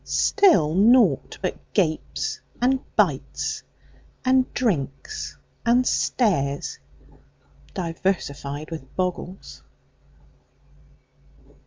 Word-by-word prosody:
Still 330 - +4
naught 230 +7 +4
but - - 0 0.2
gapes 160 -6 -1 0.2
and 260 +2 +3 0.2
bites, - - 0 0.6
And 255 0 +3
drinks 190 - -2 0.3
and 245 +2 +4
stares, 140 - 0 1.0
diversified 165 -4 -2
with 145 -5 -8
boggles? 185 0 -4
185 Hz, 65 wpm, -24 LUFS, 155-250 Hz, 1.0 s, Still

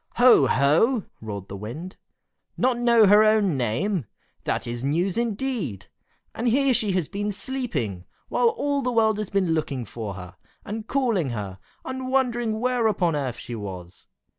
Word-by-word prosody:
"Ho! 245 - +6
ho!" 165 - +3 0.2
roared 100 -3 -6
the 100 - -7
Wind. 125 - -7 0.6
"Not 250 -1 +1
know 235 -2 +5
her 205 +2 +7
own 215 -6 +3
name? 140 - -1 0.4
That - - -1
is 120 0 -4
news, 170 +7 0
indeed! 230 - -2 0.4
And 240 - -2
here 270 +3 +3
she 210 -4 +1
has 180 -5 0
been 205 +1 -3
sleeping, 165 - -4 0.2
while 480 - +2
all 285 -11 -1
the 250 -1 -1
world 220 -2 +2
has 215 - -3
been 190 -4 +1
looking 140 -6 -2
for 105 -2 -6
her, 90 -1 -10 0.3
and 215 +1 -5
calling 230 - +1
her, 100 -5 -5 0.3
and 260 0 -4
wondering 240 -4 0
where 245 -1 +1
upon 175 -7 +1
earth 135 -5 -2
she 120 - -7
was. 95 -5 -8
200 Hz, 165 wpm, -24 LUFS, -, 0.6 s, her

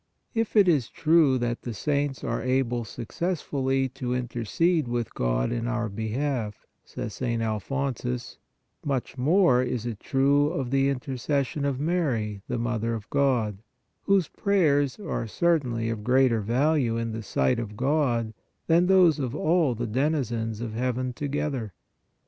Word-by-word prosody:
4. 225 - +2
"If 225 - -4
it 205 -3 +6
is 145 -9 +2
true 155 -4 +3
that 120 -1 -2
the 120 -3 -5
saints 145 -1 -1
are - - -2
able 125 -2 0
suc 115 +1 -8
cessfully 135 -6 -1
to 125 -2 -2
intercede 125 - 0
with 120 -1 -2
God - - 0
in 120 0 -2
our 120 -2 -1
behalf," 110 +1 -3 0.2
says 105 - -6
St. 120 -2 -2
Alphonsus, 125 +2 -3 0.2
" - - -49
much 130 0 -3
more 135 -1 +4
is 125 -2 -2
it 115 -4 -4
true 140 +1 +2
of 135 -6 -3
the 135 0 +3
inter 135 -1 -3
cession 140 +2 -1
of 135 -2 -1
Mary, 130 - -1
the 125 - -2
Mother 115 -1 -1
of 110 -1 -7
God, 125 -8 +1 0.5
whose 195 -4 +3
prayers 150 -9 +1
are 170 - -3
certainly 120 -6 +1
of 105 -2 -5
greater 125 -2 +3
value 125 +2 +1
in 115 0 -2
the 110 +1 -4
sight 115 +3 +1
of 105 -3 -6
God 125 -5 +1 0.3
than 170 +2 +4
those 180 -5 +5
of 130 -1 -2
all 155 -4 +2
the 120 +2 -3
denizens 120 -3 -1
of 115 -2 -4
heaven 125 +1 -1
together. 140 -6 -3
130 Hz, 160 wpm, -26 LUFS, 115-145 Hz, 0.5 s, it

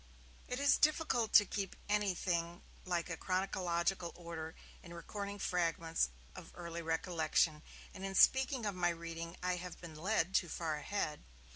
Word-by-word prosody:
It 250 - -3
is 285 0 +4
difficult 300 -7 +2
to 205 - +9
keep 195 -1 -3
anything 180 -4 0 0.2
like 175 -2 -2
chronological 185 -1 0
order 165 -2 -6 0.3
in 170 -1 -10
recording 200 +4 -5
fragments 165 - +1 0.3
of - - -10
early 170 -1 -5
recollection, 160 -1 +1 0.3
and 190 - -8
in 195 0 -3
speaking 265 +1 +5
of 205 - 0
my 175 -1 +2
reading 170 0 -5
I 180 0 +1
have 180 0 -7
been 170 -3 -9
led 180 +2 0
too 175 - +2
far 160 -2 -2
ahead. 150 -2 -2
175 Hz, 145 wpm, -36 LUFS, 170-200 Hz, 0.3 s, to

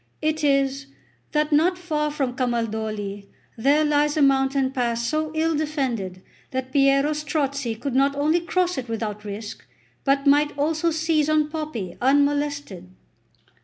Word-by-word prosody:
It 310 0 -1
is, 275 -1 +1 0.4
that 300 0 +1
not 335 +5 +3
far 305 -4 -1
from 270 -4 -2
Camaldoli 220 -5 -2 0.3
there 280 +6 +3
lies 295 0 +2
a 300 - +4
mountain 270 -1 +2
pass 235 -3 -1
so 310 +3 -1
ill 325 +1 +1
defended, 255 - -2 0.3
that 260 0 -4
Piero 275 +1 +3
Strozzi 280 -5 -2
could 275 0 -3
not 275 +2 +2
only 305 +4 +2
cross 355 -2 0
it 250 -2 -7
without 210 -2 -4
risk, 210 +1 -7 0.4
but 275 0 +1
might 290 +1 +3
also 310 +3 +1
seize 315 -1 +1
on 305 -1 +2
Poppi 300 - -5
unmolested." 285 -7 +1
280 Hz, 140 wpm, -23 LUFS, 245-300 Hz, 0.4 s, a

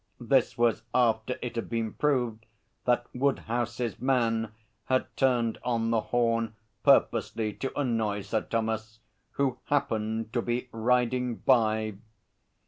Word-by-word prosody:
This 125 +1 +2
was 120 -3 +2
after 120 0 +2
it 120 -1 -4
had 115 - -3
been 115 -2 -2
proved 120 -7 0 0.4
that 120 0 +2
Woodhouse's 120 -3 -1
man 115 -4 +1 0.3
had 130 0 +2
turned 120 -4 +2
on 115 -2 0
the 115 -1 +2
horn 115 -2 0 0.3
purposely 115 -5 +3
to 135 +5 -4
annoy 110 -6 0
Sir 110 +2 -1
Thomas, 110 -1 -2 0.4
who 135 -3 0
happened 110 -5 -1
to 120 - +1
be 120 +2 -2
riding 125 +1 +1
by'! 110 -5 +2
115 Hz, 125 wpm, -28 LUFS, 110-125 Hz, 0.4 s, purposely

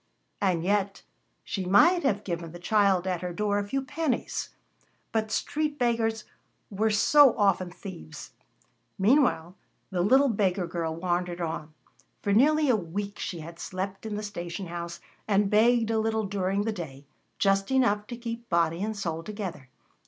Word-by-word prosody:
And 180 -5 +1
yet 200 +1 0 0.4
she 195 - -3
might 310 - +5
have 210 - 0
given 170 -3 -4
the - - -7
child 195 -1 +2
at 180 -2 -1
her 180 -1 -3
door 205 +2 0
a - - -1
few 270 +5 -1
pennies. 290 -2 -2 0.6
But 220 -1 0
street 300 +5 -1
beggars 230 -3 0 0.5
were 215 +3 +1
so 265 +5 +5
often 195 -3 +2
thieves! 180 - -10 0.7
Meanwhile 195 - +2 0.4
the 180 -2 0
little 265 +9 +5
beggar 195 -4 +1
girl 165 -1 -3
wandered 175 0 -2
on. 160 -2 -4 0.5
For 200 - +1
nearly 300 +7 +4
a 255 - +4
week 200 +2 -4
she 170 -3 -4
had 165 +2 -10
slept 190 +3 -5
in 210 - -3
the 210 - -4
station 175 -2 -5
house 170 0 -6 0.3
and 200 -1 +2
begged 225 +1 +4
a 220 - +2
little 220 0 0
during 195 0 -1
the 220 0 -1
day, 145 -7 -8 0.3
just 195 0 +2
enough 210 -6 +2
to 240 - -6
keep 235 0 -6
body 170 0 +1
and 215 +1 -2
soul 165 -5 -3
together. 185 -9 -6
200 Hz, 160 wpm, -27 LUFS, 175-225 Hz, 0.7 s, might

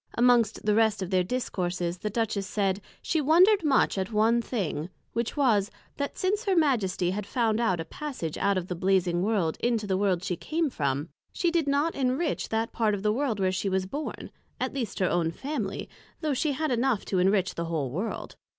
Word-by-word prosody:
Amongst 235 -3 +3
the 210 - +3
rest 215 -2 +2
of 185 - -6
their 185 -1 +3
discourses, 180 -6 -2
the 210 - -2
Duchess 210 -3 -1
said, 195 -1 0 0.2
she 320 - +1
wondred 355 +7 +5
much 275 -8 +3
at 190 +3 -3
one 225 +2 +3
thing, 180 - -3 0.2
which 235 +4 -2
was, 220 -8 +3 0.3
That 285 0 -3
since 405 +4 0
her 390 -2 +2
Majesty 215 - +2
had 205 +1 -4
found 225 -2 +1
out 185 -7 +1
a 165 - -3
passage 250 - -5
out 200 -1 +1
of 180 - -2
the 180 - -2
Blazing 180 -1 +1
World, 190 -6 +1
into 230 -3 0
the 190 -2 0
World 190 -3 +1
she 185 -2 -1
came 315 - -1
from, 140 - -1 0.2
she 345 -2 0
did 330 -4 +1
not 285 +4 +2
enrich 270 +4 -1
that 225 +1 -1
part 215 -3 +1
of 195 - -6
the 210 0 +2
World 245 -4 -1
where 190 -1 +2
she 190 +1 -1
was 190 0 0
born, 290 +10 -5 0.3
at - - -2
least 235 -7 -3
her 185 - +2
own 170 -2 +1
Family, 280 - -4 0.3
though 305 -3 0
she 285 +3 0
had 310 +2 -1
enough 245 -2 +1
to 190 - 0
enrich 190 0 +2
the 170 - -3
whole 155 -6 -2
World. 190 - -4
210 Hz, 205 wpm, -27 LUFS, 185-265 Hz, 0.3 s, wondred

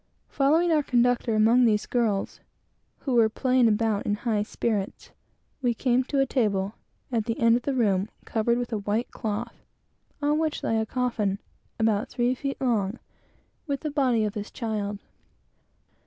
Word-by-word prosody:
Following 315 +5 +3
our 310 -2 +4
conductor 245 -3 +2
through 215 0 +5
all 235 +2 +5
these 215 -3 +3
girls, 220 -5 -1 0.6
who 265 - -2
were 230 -2 +5
playing 255 +1 +2
about 215 -1 +1
in 205 - +1
high 215 -1 -1
spirits, 210 -1 -3 0.5
we 245 -3 +1
came 250 +1 +2
to 275 +1 -1
a 270 - +4
table, 205 -6 0 0.4
at 225 -3 0
the 230 -1 -2
end 230 0 +5
of 245 - 0
the 275 +2 -2
room, 200 -5 +1 0.2
covered 235 +1 +1
with 245 -1 -3
a 215 - 0
white 210 +4 -2
cloth, 225 +1 -4 0.6
on 295 +1 +1
which 315 -2 -1
lay 225 - +1
a 220 - -1
coffin, 225 -6 -1 0.4
about 220 -2 +1
three 245 +1 +1
feet 275 +2 -4
long, 225 -4 0 0.7
with 280 -2 -2
the 305 - -3
body 255 -6 +2
of 210 -1 -1
his 210 -1 -5
child. 210 -3 -3
230 Hz, 170 wpm, -26 LUFS, 215-255 Hz, 0.7 s, through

